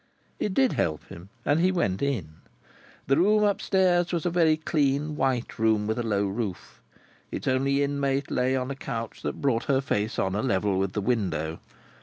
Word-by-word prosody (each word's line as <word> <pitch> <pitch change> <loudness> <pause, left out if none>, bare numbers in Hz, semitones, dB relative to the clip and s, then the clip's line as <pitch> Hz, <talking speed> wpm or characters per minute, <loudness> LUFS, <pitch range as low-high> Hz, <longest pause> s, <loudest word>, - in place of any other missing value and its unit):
It 195 -3 -2
did 265 -2 +4
help 80 -2 -1
him, 85 +3 -11 0.2
and 145 +2 +3
he 185 +2 +3
went 100 - 0
in. 105 - -2 0.7
The 135 +1 +2
room 210 +5 +4
up 205 -1 +1
stairs 180 -2 +2
was 170 -2 -2
a 175 - +1
very 165 -3 +3
clean 150 -1 0
white 130 -5 -1
room 110 -2 +2
with 110 +2 -1
a - - +1
low 105 -3 0
roof. 100 -2 -5 0.5
Its - - -5
only 135 +2 +2
inmate 140 -1 -1
lay 130 +1 +1
on 130 +1 -2
a - - -4
couch 115 -4 -5
that - - -4
brought 125 -5 +1
her 135 -3 +2
face 110 -5 -1
on 95 - 0
a 105 - 0
level 100 -5 +1
with 95 0 -1
the 105 - -1
window. 90 -9 -1
130 Hz, 195 wpm, -26 LUFS, 105-150 Hz, 0.7 s, did